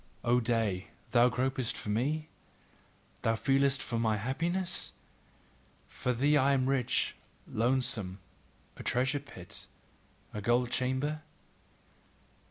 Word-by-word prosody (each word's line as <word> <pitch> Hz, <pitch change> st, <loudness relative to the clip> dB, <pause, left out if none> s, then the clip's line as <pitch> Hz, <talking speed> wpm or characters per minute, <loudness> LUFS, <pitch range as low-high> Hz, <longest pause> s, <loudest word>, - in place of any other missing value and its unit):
O 120 Hz, +1 st, +4 dB
day, 110 Hz, -5 st, 0 dB, 0.2 s
thou 120 Hz, 0 st, +6 dB
gropest 130 Hz, -1 st, -1 dB
for -, -, -6 dB
me? 145 Hz, +9 st, 0 dB, 0.9 s
Thou 115 Hz, -, +2 dB
feelest 135 Hz, +3 st, +2 dB
for 115 Hz, -, -2 dB
my 110 Hz, -2 st, +2 dB
happiness? 170 Hz, -, -1 dB, 0.9 s
For 125 Hz, -, -2 dB
thee 140 Hz, +5 st, +3 dB
am 135 Hz, -1 st, +4 dB
I -, -, +3 dB
rich, 130 Hz, -3 st, +1 dB, 0.3 s
lonesome, 115 Hz, -5 st, +1 dB, 0.6 s
a -, -, -7 dB
treasure 130 Hz, +3 st, +1 dB
pit, 95 Hz, -10 st, -9 dB, 0.7 s
a 105 Hz, -, -4 dB
gold 120 Hz, +3 st, +2 dB
chamber? 130 Hz, +5 st, 0 dB
125 Hz, 110 wpm, -31 LUFS, 115-135 Hz, 0.9 s, thou